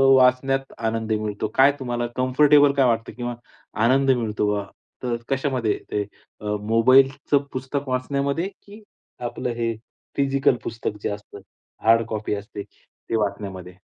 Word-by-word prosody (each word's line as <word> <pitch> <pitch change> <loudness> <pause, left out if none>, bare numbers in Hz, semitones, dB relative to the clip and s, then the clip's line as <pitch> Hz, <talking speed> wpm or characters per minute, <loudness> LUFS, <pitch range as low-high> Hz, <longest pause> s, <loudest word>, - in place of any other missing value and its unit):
वाचण्यात 130 +1 +3
आनंद 115 -1 -2
मिळतो? 105 -1 -2
काय 135 +2 +7
तुम्हाला 120 -2 -2
कम्फर्टेबल 145 +3 +5
काय 135 -2 +3
वाटतं 115 -1 0
किंवा 120 -1 -3 0.5
आनंद 135 +2 +4
मिळतो 110 -4 0
बा? 100 -1 -2 0.4
तर 120 -1 0
कशामध्ये 130 -6 0
ते 105 - 0 0.4
अ, - - -9 0.2
मोबाईलचं 130 +6 +4
पुस्तक 130 +2 -3
वाचण्यामध्ये 140 +6 -1
की 205 +2 -16 0.4
आपलं 120 - -3
हे 115 -1 -1 0.4
फिजिकल 140 -1 +3
पुस्तक 115 -2 -4
जे - - -1
असतं 100 0 -8 0.5
हार्ड 115 0 +5
कॉपी 110 -1 -3
असते 100 0 -7
ते 115 - -9
वाचण्यामध्ये? 95 -4 -3
125 Hz, 135 wpm, -23 LUFS, 110-135 Hz, 0.5 s, काय